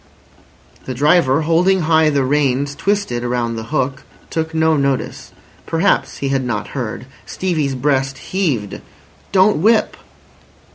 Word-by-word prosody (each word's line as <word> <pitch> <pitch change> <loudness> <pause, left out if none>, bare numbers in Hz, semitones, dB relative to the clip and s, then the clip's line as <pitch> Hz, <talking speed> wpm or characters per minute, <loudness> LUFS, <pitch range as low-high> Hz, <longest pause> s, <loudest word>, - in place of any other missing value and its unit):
The 130 - -5
driver, 145 +1 +3
holding 180 +4 +2
high 160 -1 +3
the 140 -2 +1
reins 140 0 +1
twisted 195 -9 -1
around 120 -1 -1
the 110 0 -5
hook, 135 0 -2 0.3
took 160 0 -2
no 160 0 +2
notice. 140 -2 -2 0.4
Perhaps 165 +5 +1
he 140 - -2
had 135 -1 0
not 120 -4 -3
heard. 125 -3 -5 0.2
Stevie's 155 -7 -1
breast 135 0 0
heaved. 140 - -2 0.5
"Don't 190 0 +4
whip." 220 +3 +3
145 Hz, 130 wpm, -18 LUFS, 130-165 Hz, 0.5 s, Don't